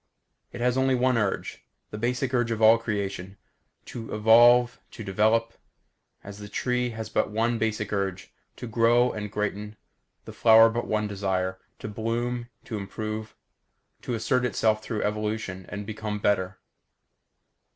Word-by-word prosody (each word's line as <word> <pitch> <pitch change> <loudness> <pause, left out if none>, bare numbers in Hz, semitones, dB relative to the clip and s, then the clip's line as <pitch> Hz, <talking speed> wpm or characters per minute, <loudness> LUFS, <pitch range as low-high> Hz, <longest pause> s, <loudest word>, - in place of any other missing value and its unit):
It - - -8
has 125 +1 +1
only 130 0 +2
one 125 0 +2
urge; 105 -4 -2 0.3
the 105 - -6
basic 125 +3 -1
urge 120 -2 +1
of 115 -1 -2
all 110 +1 +6
creation. 100 -3 -4 0.5
To 115 -3 -7
evolve, 120 +3 +5
to 110 - -9
develop. 110 +3 +1 0.7
As 100 0 -10
the 105 0 -9
tree 125 +3 -1
has 110 -1 -6
but - - 0
one 115 +2 0
basic 110 -2 -2
urge 95 -2 -3 0.2
to 125 - -8
grow 120 +2 +3
and 105 -1 -6
greaten; 105 0 -3 0.5
the - - -9
flower 115 0 +6
but 120 +1 -3
one 110 0 0
desire 95 -2 -2 0.2
to - - -7
bloom, 120 +3 -3 0.2
to 110 - -5
improve; 110 +2 -6 0.7
to 120 - -3
assert 125 +3 0
itself 110 -2 +1
through 110 -2 -3
evolution 105 -3 -3
and 100 0 -6
become 105 0 -4
better. 95 -3 0
110 Hz, 150 wpm, -26 LUFS, 105-120 Hz, 0.7 s, all